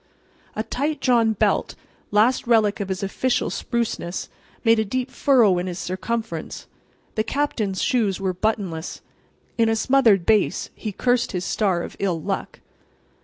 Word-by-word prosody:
A 215 - -1
tight 285 +6 -2
drawn 235 -4 +3
belt—last 215 +3 0
relic 220 -3 +3
of 200 -2 -3
his 190 +1 -3
official 245 +6 0
spruceness—made 225 +1 -2
a - - +3
deep 255 +5 -3
furrow 230 -10 +4
in 180 - -3
his 175 -1 -4
circumference. 190 -1 -4 0.5
The 215 - 0
Captain's 220 -7 -1
shoes 220 -8 +1
were 190 -1 -1
buttonless. 185 -4 -2 0.6
In 225 -1 +4
a 225 - +2
smothered 225 -7 +3
bass 215 -2 +2
he 215 - -5
cursed 245 +3 +1
his 180 0 -2
star 190 -5 0
of - - -8
ill 180 -4 0
luck. - - -4
215 Hz, 140 wpm, -23 LUFS, 190-235 Hz, 0.6 s, furrow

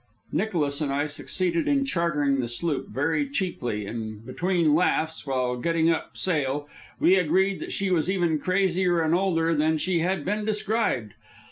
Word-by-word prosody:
Nicholas 155 -9 -1
and 145 -2 0
I 145 +2 0
succeeded 170 +3 -1
in 275 -1 +2
chartering 150 - +1
the 120 - -1
sloop 140 +5 -1
very 160 - 0
cheaply; 130 - -2
and 110 0 -6
between 170 +4 +1
laughs, 160 -2 +1
while 125 -2 0
getting 165 +4 +2
up 160 - -3
sail, 145 -4 0 0.3
we 180 - +5
agreed 185 +3 +2
that - - -6
she 195 -1 -1
was 170 -1 +1
even 175 -5 +1
crazier 185 0 +1
and 160 0 +1
older 170 -3 +2
than 155 +1 +2
she 175 +2 0
had 185 +3 -1
been 210 +2 -1
described. 210 - -1
165 Hz, 160 wpm, -25 LUFS, 145-185 Hz, 0.3 s, we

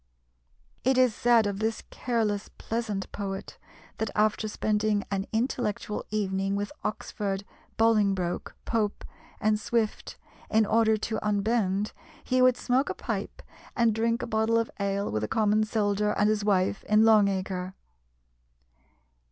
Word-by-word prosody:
It 260 +1 +3
is 255 -3 +4
said 235 0 +4
of 200 -1 -2
this 220 0 -1
careless, 220 -4 -1
pleasant 215 -4 -3
poet, 195 -1 -5 0.4
that 220 - -1
after 215 0 +2
spending 210 -1 0
an 195 0 -1
intellectual 220 -3 -2
evening 195 -2 -1
with 205 0 -2
Oxford, 200 -2 -3 0.3
Bolingbroke, 200 -6 +1
Pope, 215 -3 -1 0.3
and 215 0 +2
Swift, 220 0 -2 0.3
in 220 0 +3
order 220 +1 +3
to 220 +1 -3
unbend, 210 -1 0 0.3
he 255 0 +1
would 255 -1 +5
smoke 260 +3 +1
a - - -3
pipe - - -5 0.3
and 235 -2 +3
drink 230 +2 0
a - - -1
bottle 220 0 +1
of 230 0 0
ale 200 0 -1
with 110 0 -1
a - - -1
common 215 - +2
soldier 210 -1 0
and 205 - +2
his 210 -1 -1
wife 195 -1 +1
in 215 +1 +4
Long 215 -2 +6
Acre. 190 -1 -3
215 Hz, 140 wpm, -27 LUFS, 200-225 Hz, 0.4 s, Long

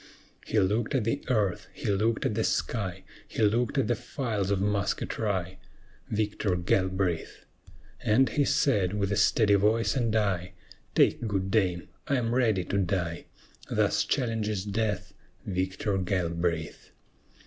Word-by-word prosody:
He - - -1
looked 105 +7 +1
at 130 - +2
the 115 - -1
earth, 105 -8 0
he - - -9
looked 110 +3 +1
at - - +1
the 110 +1 0
sky, 95 -6 -1 0.2
He 115 - -2
looked 115 +6 +2
at 135 - +3
the 120 - +2
files 110 -4 -3
of 100 -1 +1
musketry, 100 -1 -1 0.5
Victor 105 -3 0
Galbraith! 95 -1 -1 0.6
And 125 +5 +4
he 145 - +1
said, 100 -10 +2
with 100 -1 0
a - - +2
steady 105 +1 +4
voice 110 +5 +3
and 115 -4 +1
eye, 95 -4 0 0.4
"Take 115 - +3
good 95 0 -1
aim; 90 -5 +1 0.2
I 140 - +2
am 120 -2 0
ready 110 -7 +2
to 100 +3 -1
die!" 90 -3 -1 0.4
Thus - - +2
challenges 110 -5 -1
death 105 +1 -2 0.3
Victor 95 +1 -1
Galbraith. 85 -4 -2
100 Hz, 140 wpm, -28 LUFS, 95-110 Hz, 0.6 s, And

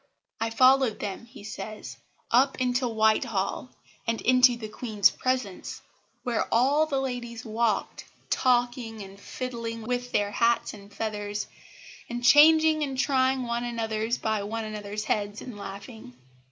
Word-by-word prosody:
"I 225 - 0
followed 255 0 +4
them," 205 +3 -5
he 235 - -14
says, 215 0 -7 0.4
"up 265 +3 +3
into 250 0 +1
Whitehall, 220 0 0 0.4
and 230 0 0
into 255 -1 +5
the 220 -2 -6
Queen's 215 -2 +2
presence, 255 -7 -3 0.4
where 240 -2 -1
all 280 +7 +3
the 275 -3 0
ladies 245 -3 -5
walked, 225 0 -1 0.3
talking 240 -3 +1
and 195 0 -12
fiddling 230 -1 -5
with 245 +1 -3
their 205 0 +1
hats 235 +1 +1
and 200 -1 -13
feathers, 210 -1 -3 0.6
and 240 0 -4
changing 310 +3 +6
and 270 -3 -2
trying 260 -1 +2
one 235 0 -2
another's 225 -1 -2
by 220 -1 -1
one 220 +2 -4
another's 210 -1 -5
heads 205 -1 -2
and 250 -4 -8
laughing. 200 - -9
235 Hz, 140 wpm, -27 LUFS, 215-255 Hz, 0.6 s, changing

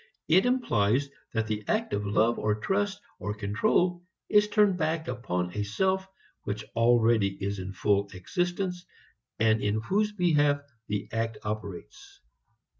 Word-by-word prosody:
It 185 +8 +5
implies 140 - +1 0.2
that 110 -1 0
the 105 -1 -3
act - - 0
of 100 0 -1
love 110 +3 +2
or 105 0 +1
trust 200 - 0 0.2
or 105 0 -3
control 110 - +1 0.3
is 210 0 +5
turned 205 -2 +3
back 160 0 -1
upon 90 -8 -3
a 105 - -1
self 190 - 0 0.3
which 105 +2 -4
already 115 -3 +4
is 100 0 -4
in 95 +1 -5
full 100 0 +1
existence 175 - -2 0.5
and 110 0 +3
in 105 +1 +1
whose 210 - +1
behalf 150 -7 +2 0.3
the 105 0 -2
act 115 0 -2
operates. 105 -4 -7
115 Hz, 140 wpm, -28 LUFS, -, 0.5 s, It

